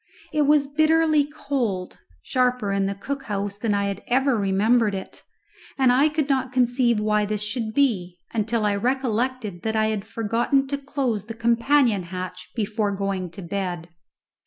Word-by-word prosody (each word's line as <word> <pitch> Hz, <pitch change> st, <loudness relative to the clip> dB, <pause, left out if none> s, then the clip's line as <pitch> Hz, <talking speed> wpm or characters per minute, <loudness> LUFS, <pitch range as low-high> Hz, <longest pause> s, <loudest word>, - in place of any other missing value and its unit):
It 300 Hz, -2 st, +2 dB
was 295 Hz, -1 st, +4 dB
bitterly 310 Hz, +1 st, +3 dB
cold, 250 Hz, -11 st, -3 dB, 0.2 s
sharper 250 Hz, -5 st, +1 dB
in 195 Hz, 0 st, +1 dB
the 200 Hz, -, -3 dB
cook 275 Hz, +7 st, -5 dB
house 200 Hz, 0 st, -3 dB
than 210 Hz, -2 st, 0 dB
I 200 Hz, 0 st, +1 dB
had 200 Hz, 0 st, -3 dB
ever 265 Hz, +1 st, +2 dB
remembered 210 Hz, +2 st, +2 dB
it, 190 Hz, -, -8 dB, 0.6 s
and 260 Hz, -2 st, +4 dB
I 275 Hz, +5 st, +4 dB
could 305 Hz, -2 st, -1 dB
not 265 Hz, -2 st, 0 dB
conceive 245 Hz, -2 st, +2 dB
why 210 Hz, 0 st, +2 dB
this 210 Hz, 0 st, -1 dB
should 220 Hz, +1 st, -3 dB
be, 190 Hz, -11 st, +1 dB, 0.2 s
until 220 Hz, 0 st, 0 dB
I 205 Hz, -, +2 dB
recollected 245 Hz, -3 st, -1 dB
that 220 Hz, 0 st, -2 dB
I 220 Hz, 0 st, +2 dB
had 215 Hz, -1 st, -3 dB
forgotten 230 Hz, +5 st, +1 dB
to 280 Hz, -, -1 dB
close 265 Hz, -7 st, -2 dB
the 225 Hz, +1 st, -7 dB
companion 235 Hz, -1 st, +3 dB
hatch 185 Hz, +1 st, -7 dB
before 215 Hz, -1 st, -1 dB
going 195 Hz, -2 st, -2 dB
to 190 Hz, +3 st, -10 dB
bed. 175 Hz, -2 st, -4 dB
225 Hz, 165 wpm, -24 LUFS, 200-265 Hz, 0.6 s, was